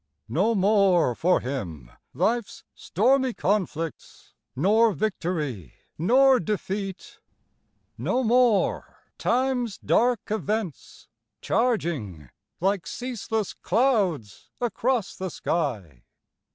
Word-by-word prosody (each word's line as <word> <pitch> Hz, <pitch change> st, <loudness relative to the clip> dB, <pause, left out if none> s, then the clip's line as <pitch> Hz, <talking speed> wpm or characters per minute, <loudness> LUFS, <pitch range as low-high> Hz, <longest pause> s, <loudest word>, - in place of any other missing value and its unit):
No 195 Hz, -, +1 dB
more 195 Hz, -, +3 dB
for 180 Hz, +9 st, +2 dB
him 85 Hz, -, -5 dB, 0.2 s
life's 235 Hz, -1 st, -1 dB
stormy 255 Hz, -, +1 dB
conflicts, 175 Hz, -5 st, -3 dB, 0.2 s
Nor 215 Hz, -, +3 dB
victory, 165 Hz, -, -3 dB, 0.2 s
nor 255 Hz, -, +4 dB
defeat 195 Hz, 0 st, -4 dB, 0.8 s
no 260 Hz, -, 0 dB
more 240 Hz, -2 st, +1 dB, 0.2 s
time's 245 Hz, -3 st, 0 dB
dark 240 Hz, -3 st, +1 dB
events, 215 Hz, -, -4 dB, 0.3 s
Charging 155 Hz, -, -1 dB, 0.3 s
like 195 Hz, 0 st, 0 dB
ceaseless 225 Hz, -4 st, -3 dB
clouds 195 Hz, -, 0 dB
across 240 Hz, -2 st, -1 dB
the 185 Hz, 0 st, -4 dB
sky. 110 Hz, -, -3 dB
200 Hz, 85 wpm, -25 LUFS, 160-235 Hz, 0.8 s, nor